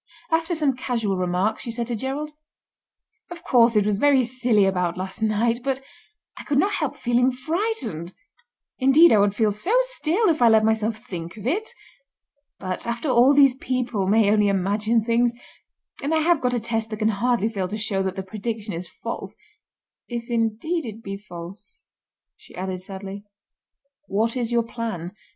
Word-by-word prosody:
After 325 +2 +1
some 295 -5 +1
casual 230 -6 -1
remarks, 185 +4 0
she - - -6
said 235 +1 -2
to 240 0 -3
Gerald: 275 +6 -4 1.0
"Of 350 -1 -9
course 235 -2 +4
it 210 -1 +4
was 205 -1 0
very 280 -1 +4
silly 240 -4 +2
about 180 -2 0
last 190 +3 -6
night, 225 +2 +1
but 270 -1 -1 0.6
I - - -9
could 285 - -1
not 390 +8 +3
help 300 -8 -2
feeling 245 0 +2
frightened. 255 - -3 0.6
Indeed 275 +5 +6
I 215 - +5
would 200 0 +2
feel 215 -1 +2
so 355 - +1
still 455 -5 0
if 315 -4 +1
I 235 - +7
let 220 -1 +5
myself 220 0 +1
think 180 -4 -8
of 210 - -9
it. 395 - -1 0.9
But, 185 +3 -4
after 235 +5 -2
all 255 +3 +5
these 275 -2 +6
people 250 -6 -2
may 210 0 +4
only 210 -1 +3
imagine 205 +4 +1
things, 235 0 +2 0.7
and 300 +3 0
I 315 - +2
have 335 -1 +3
got 250 -1 +1
a - - +1
test 225 0 -2
that 215 - -5
can 215 0 +1
hardly 225 +1 +1
fail 200 -5 -2
to 210 +4 -4
show 210 -3 -1
that 190 -1 -2
the 190 - -4
prediction 215 +1 -5
is 170 +2 -5
false—if 235 +6 -9
indeed 235 +9 0
it 225 -2 -8
be 195 0 -5
false," 195 - -11 0.5
she - - -17
added 185 0 -4
sadly. 195 +1 -8 0.8
"What 225 +4 0
is 240 -2 -1
your 235 -1 +2
plan?" 225 -7 -5
230 Hz, 175 wpm, -23 LUFS, 200-260 Hz, 1.0 s, I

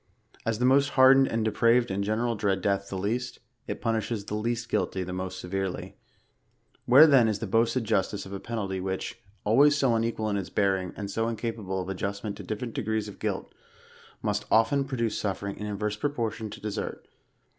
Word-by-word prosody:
As 115 -1 +1
the 125 - +1
most 140 +2 +4
hardened 135 +1 +7
and 115 -1 -1
depraved, 115 +2 +3
in 95 +1 -1
general, 110 +4 0
dread 100 -3 0
death 100 -1 0
the 95 - -4
least, 115 +7 -2 0.3
it - - -4
punishes 110 -2 -1
the - - -6
least 115 +2 -2
guilty, 95 -4 -1
the 90 0 -5
most 95 0 -4
severely^ 95 0 -3 0.9
Where 135 +6 +9
then 135 -7 +6
is 110 -2 0
the 115 - -4
boasted 115 +4 +2
justice 105 -2 0
of 95 - -9
a 100 - -4
penalty 100 -5 -3
which, 95 +4 -4 0.2
always 140 +7 +5
so 135 -4 +3
unequal 115 -1 0
in 100 - 0
its 95 -2 -4
bearing, 95 -2 +1
and 100 -1 -4
so 115 +3 0
incapable 110 -4 -3
of 90 - -4
adjustment 100 +2 -3
to - - -8
different 115 +2 -4
degrees 110 -5 -1
of 105 - -10
guilt, - - -3 0.7
must - - -1
often 115 +5 +3
produce 120 -5 -2
suiering 100 0 -3
in 105 - -6
inverse 105 0 -2
proportion 115 -5 -2
to 105 - -9
desert 105 -1 -5
110 Hz, 190 wpm, -27 LUFS, 100-115 Hz, 0.9 s, Where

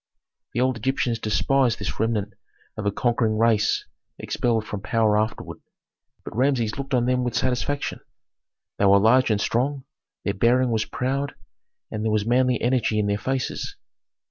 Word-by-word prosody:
The 120 - +1
old 130 -1 +1
Egyptians 120 -1 -1
despised 120 +3 +1
this - - -5
remnant 105 -2 -1 0.4
of 105 -1 -3
a - - +2
conquering 115 0 0
race 110 -2 +2 0.3
expelled 115 -3 -1
from 105 -2 -5
power 110 0 +2
afterward, 110 +1 -2 0.7
but - - -8
Rameses 125 -3 +1
looked 135 -1 -2
on 120 -1 +2
them 125 0 +1
with 120 - -2
satisfaction. 130 +3 -1 0.8
They 100 - +3
were 100 0 +7
large 115 +6 +4
and 105 -2 +2
strong, 130 +6 0 0.4
their 100 - 0
bearing 120 +5 +2
was 110 -1 0
proud, 135 +2 -2 0.6
and 105 0 -3
there 110 - 0
was 105 -1 +1
manly 125 +1 +2
energy 120 -3 +1
in 105 - +1
their 100 0 0
faces. 130 +3 -3
115 Hz, 160 wpm, -24 LUFS, 110-130 Hz, 0.8 s, were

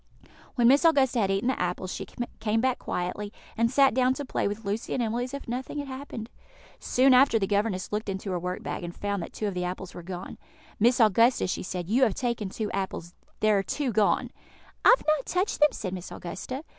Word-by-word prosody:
When 240 -3 +4
Miss 275 +5 +5
Augusta 275 -7 +4
had 195 -3 +2
eaten 195 +4 0
the 260 - -1
apples, 180 +1 -2
she 195 - -6 0.3
came 220 +1 +1
back 255 +1 +1
quietly, 180 +4 -3 0.2
and 230 +1 +2
sat 270 0 +4
down 255 +1 +3
to 285 - -5
play - - -1
with 205 +2 -5
Lucy 205 +3 -2
and 245 - 0
Emily 235 +2 -1
as 255 - -9
if 280 - -8
nothing 255 +4 -4
had 285 -1 -3
happened. 260 -4 -7 0.5
Soon 260 +1 +4
after 255 -2 +6
the 200 - +1
governess 200 -1 -1
looked 210 0 -2
into 195 0 -4
her 180 - -1
work 180 +1 -4
bag, - - -4
and 175 0 -6
found 200 -2 -2
that - - -7
two 215 - -4
of 200 - -2
the 180 0 -2
apples 180 +1 -5
were - - -8
gone. 180 +1 -7 0.4
"Miss 240 +4 +4
Augusta," 230 +3 +4
she 185 - -2
said, 180 -2 -4
"you 235 +7 +2
have 225 -7 +4
taken 235 -5 -2
two 210 +2 -4
apples: 190 -3 -4 0.3
there 215 -2 +4
are - - +1
two 270 +6 -2
gone." 215 -2 +2 0.5
"I - - +7
have - - -16
not 305 -3 +1
touched 370 +3 0
them," 300 0 +6
said 185 -3 -5
Miss 180 -1 -7
Augusta. 255 - -6
220 Hz, 230 wpm, -27 LUFS, 190-255 Hz, 0.5 s, I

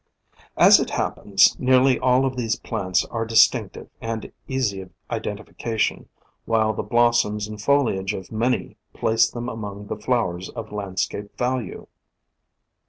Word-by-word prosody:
As - - +8
it - - -2
happens, - - +2
nearly 130 0 +4
all 130 +1 +3
of 130 -1 -2
these 115 -3 -1
plants 95 -6 -1
are 115 -1 -2
dis 110 0 +6
tinctive - - -7
and 115 -1 -5 0.2
easy 125 -8 -1
of 95 - -11 0.2
identification, 110 0 -3 0.4
while 110 -1 +2
the - - -3
blos 120 0 +3
soms 105 -1 -4
and 105 -1 -8
foliage 110 -8 +1
of 95 -2 -9
many 115 +3 -1 0.2
place 110 0 +2
them 120 0 -6
among 105 -3 -6
the - - -4
flowers 95 -7 -1
of 115 -2 -8
landscape 100 0 -4
value. 125 -4 -2
110 Hz, 145 wpm, -23 LUFS, 105-120 Hz, 0.4 s, As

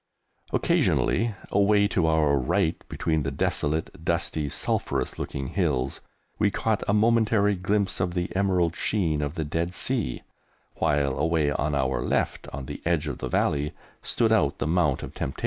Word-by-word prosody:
Occasionally, 110 +2 +1 0.2
away 100 +1 +4
to 85 -6 +1
our 80 -3 +3
right, 65 -2 0
between 80 -1 0
the 70 - -1
desolate, 75 +3 -1
dusty, 75 -2 -1
sulphurous - - -1
looking 70 -1 -4
hills, 70 -9 -1 0.4
we 105 -1 +4
caught 110 0 0
a 100 - +2
momentary 110 -2 +3
glimpse 100 +1 0
of 90 -1 -1
the 90 +1 -2
emerald 90 -3 +1
sheen 80 -8 0
of 75 +2 -3
the 80 - -2
Dead 85 +4 -2
Sea, 120 - -1 0.5
while 70 -3 +1
away 80 -1 +2
on 75 +1 -1
our 65 -3 0
left - - -1
on 70 0 -6
the - - -7
edge 85 -3 +1
of 75 - -4
the - - -4
valley, 75 0 0 0.3
stood - - +1
out - - +2
the - - -2
Mount 80 -4 +1
of - - -7
Temptation. 65 - -4
80 Hz, 165 wpm, -26 LUFS, 75-100 Hz, 0.5 s, away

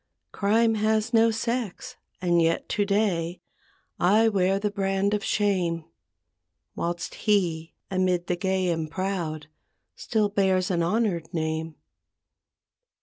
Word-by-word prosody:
Crime 225 +3 +2
has 220 +2 0
no 230 0 +5
sex 235 +2 -3 0.2
and 175 -2 +2
yet 165 0 +1
to 205 - +1
day 190 -4 0 0.6
I 215 +5 +4
wear 195 -2 +2
the 205 +1 -1
brand 195 0 0
of 210 -1 -1
shame; 180 -7 0 0.9
Whilst 170 0 -3
he 170 -6 0 0.2
amid 185 -2 +1
the 180 - -1
gay 190 0 0
and 160 -2 -2
proud 165 -4 -3 0.5
Still 215 -2 0
bears 190 -1 +1
an 170 -2 +1
honored 170 -3 0
name. 160 0 -2
190 Hz, 120 wpm, -26 LUFS, 170-210 Hz, 0.9 s, no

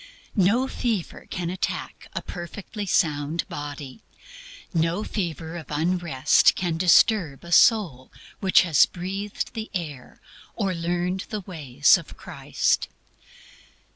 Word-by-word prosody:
No 220 +6 +3
fever 225 -9 -3
can 175 -1 -3
attack 185 - -4
a - - -4
perfectly 200 +4 -7
sound 150 -1 0
body; 145 +3 -7 0.7
no 165 +4 +1
fever 170 -6 -4
of 160 -5 -9
unrest 155 -3 +3
can 175 -3 -1
disturb 175 -3 +3
a 170 - -10
soul 170 - +4 0.3
which 190 -1 +5
has 165 -5 +5
breathed 195 +3 -5
the 220 0 -5
air 150 -8 -6 0.4
or 195 -4 -1
learned 175 +2 -2
the 210 -2 -4
ways 150 - +3
of - - -12
Christ. - - -1
175 Hz, 115 wpm, -24 LUFS, 155-195 Hz, 0.7 s, which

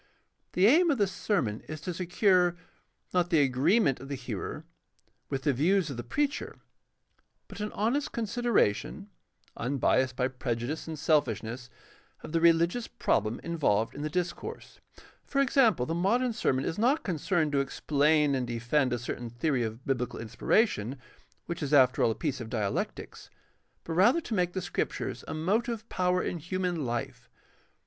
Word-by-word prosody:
The 185 - +4
aim 330 - +6
of 285 - +2
the 205 - +3
sermon 165 - -1
is 155 0 -5
to 180 +1 -4
secure, 180 0 +2 0.6
not 175 -1 +2
the 165 -4 +4
agreement 135 - +2
of 135 - -9
the 140 - -2
hearer 120 -6 -6 0.6
with 135 -1 -3
the 145 - +2
views 165 +4 +2
of 130 - -6
the 120 - -4
preacher, 285 - -2 0.9
but 200 - -10
an 210 0 -3
honest 240 +8 0
consideration, 230 - 0 0.4
unbiased 130 0 +1
by 125 0 +1
prejudice 130 +3 -4
and 160 -1 -5
selfish 145 - +1
ness, 120 +3 -7 0.5
of - - -8
the 165 0 +1
religious 170 +7 +3
problem 105 +2 0
involved 115 -10 0
in 145 - -7
the 155 - -2
discourse. 180 +2 -4 0.4
For 275 - -2
example, 245 - +3
the 165 - -2
modern 230 +8 +1
sermon 135 - 0
is 160 - -3
not 260 +7 +2
concerned 170 -2 0
to 140 - +2
explain 145 +1 +2
and 130 -2 -1
defend 120 +3 0
a - - 0
certain 120 0 -5
theory 125 +3 0
of 115 +2 -4
biblical 125 -3 -2
inspiration, 120 - 0 0.5
which 170 - -5
is 145 0 +1
after 130 -2 +5
all - - +4
a 110 - -1
piece 140 -5 -3
of 110 - -7
dialectics, 105 -5 -3 0.5
but 165 - -5
rather 210 - +5
to 245 - -6
make 180 -3 +1
the 185 - -3
Scriptures 175 - -3
a - - -4
motive 220 +7 -1
power 180 0 +1
in 175 - -3
human 180 +2 -2
hfe. 120 -4 -4
155 Hz, 165 wpm, -29 LUFS, 125-190 Hz, 0.9 s, aim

